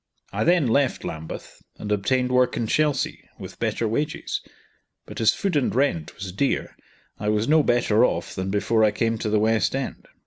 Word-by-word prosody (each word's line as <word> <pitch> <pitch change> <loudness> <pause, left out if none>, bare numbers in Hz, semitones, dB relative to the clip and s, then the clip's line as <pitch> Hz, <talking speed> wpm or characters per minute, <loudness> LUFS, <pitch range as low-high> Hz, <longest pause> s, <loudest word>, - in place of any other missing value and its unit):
I - - 0
then 170 -2 +3
left 130 +3 +1
Lambeth, 80 0 -7 0.2
and 105 - -5
obtained 125 +5 +1
work 125 0 +2
in 120 - 0
Chelsea, 145 +3 0
with - - -10
better 115 - -1
wages; 150 +8 -2 0.6
but - - -7
as 110 - +6
food 195 -4 -2
and 140 -5 +1
rent 125 - 0
was 100 -3 -6
dear, 135 +10 -1 0.4
I 105 - -1
was 105 +2 +1
no 155 +1 +5
better 120 -4 +3
off - - 0
than 95 0 -3
before 110 +3 +2
I 110 - +6
came 115 +2 -1
to 105 - -2
the 105 - +2
West 110 +3 +2
End. 135 -1 -5
115 Hz, 185 wpm, -24 LUFS, 105-135 Hz, 0.6 s, as